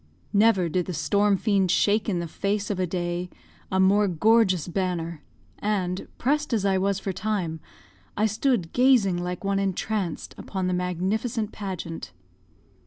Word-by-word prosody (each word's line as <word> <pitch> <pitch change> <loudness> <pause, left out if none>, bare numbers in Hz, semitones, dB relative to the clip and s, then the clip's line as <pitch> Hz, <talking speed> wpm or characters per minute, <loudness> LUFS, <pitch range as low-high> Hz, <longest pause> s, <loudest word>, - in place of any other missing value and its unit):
Never 205 -4 +4
did 180 +2 -1
the 180 - -3
storm 200 +6 +2
fiend 195 -3 +1
shake 210 +4 +2
in 185 - 0
the 170 0 -3
face 200 +5 -2
of 195 - -3
a 185 - +1
day 175 0 -3 0.4
a 190 - +1
more 200 +2 +4
gorgeous 190 -1 +3
banner; 170 -3 -2 0.4
and, 190 -3 -1
pressed 295 +1 0
as 210 -3 +1
I 190 -1 +2
was 195 0 +1
for 195 0 -3
time, 185 -5 -2 0.6
I 210 - +3
stood 215 -4 0
gazing 245 -8 +4
like 180 +1 -4
one 195 0 +1
entranced 195 -2 -2
upon 190 -2 -3
the 180 - 0
magnificent 200 +5 -1
pageant. 170 - -6
195 Hz, 155 wpm, -25 LUFS, 180-210 Hz, 0.6 s, Never